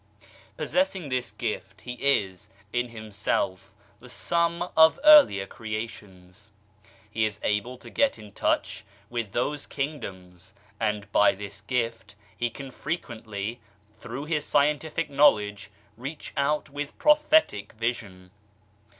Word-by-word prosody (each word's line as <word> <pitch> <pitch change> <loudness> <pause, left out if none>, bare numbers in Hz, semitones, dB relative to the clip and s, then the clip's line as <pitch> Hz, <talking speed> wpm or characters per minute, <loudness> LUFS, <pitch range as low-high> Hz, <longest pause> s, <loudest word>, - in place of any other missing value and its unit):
Possessing 195 - 0
this 125 -1 -1
gift, 105 -4 -5
he 125 - -6
is, 105 -9 0 0.2
in 120 0 0
himself, 100 -3 -2 0.3
the 125 - -14
sum 170 +5 0
of 160 +6 +7
earlier 295 - +8
creations 105 -3 -8 0.6
he 110 +1 0
is 105 -1 -1
able 105 +5 -1
to - - -13
get 280 -1 +2
into 105 -1 -12
touch - - 0 0.3
with 115 -4 -3
those 145 +7 -2
kingdoms; 95 - -6 0.2
and 105 -2 -1
by 105 - +5
this 100 0 -8
gift, 115 -2 -2 0.2
he 120 - -1
can 135 +3 -9
frequently, 115 - -5 0.4
through 125 +5 -6
his 155 -2 -1
scientific 150 +2 +1
knowledge, 105 -9 +3 0.3
reach 135 +6 -7
out 150 +2 +1
with 145 0 -5
prophetic 300 - +3
vision. 110 -5 -4
115 Hz, 120 wpm, -27 LUFS, 105-145 Hz, 0.6 s, earlier